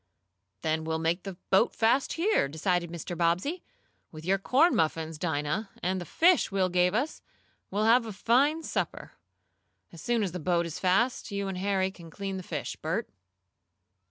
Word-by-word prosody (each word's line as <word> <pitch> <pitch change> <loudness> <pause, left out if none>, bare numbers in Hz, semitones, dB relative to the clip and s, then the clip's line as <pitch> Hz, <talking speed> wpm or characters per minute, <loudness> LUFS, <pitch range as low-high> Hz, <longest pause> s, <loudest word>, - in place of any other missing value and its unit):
"Then 160 0 0
we'll 160 0 -1
make 165 +3 0
the 195 -2 -5 0.2
boat 195 +5 +4
fast 235 +5 +2
here," 355 - +2
decided 170 +4 -1
Mr. 170 +1 -6
Bobbsey. 180 - 0 0.5
"With 155 0 -10
your 195 +2 +2
corn 285 - +3
muffins, 160 0 -1
Dinah, 160 +5 -1
and 185 +1 0
the - - -6
fish 345 -5 +3
Will 190 -1 +1
gave 180 +2 +2
us, 275 +7 -1 0.5
we'll 210 +3 0
have 230 +1 +4
a - - -5
fine 270 +10 +2
supper. - - -3 0.8
As 170 - -11
soon 235 -2 +1
as 190 - -2
the 180 - -5
boat 170 +1 +1
is 165 - -6
fast 210 +9 +1
you 200 -1 -3
and 190 -1 -4
Harry 190 -1 +1
can 170 -3 -13
clean 195 +2 -5
the - - -5
fish, 160 -5 -5
Bert." 185 +9 -3
185 Hz, 175 wpm, -28 LUFS, 170-225 Hz, 0.8 s, boat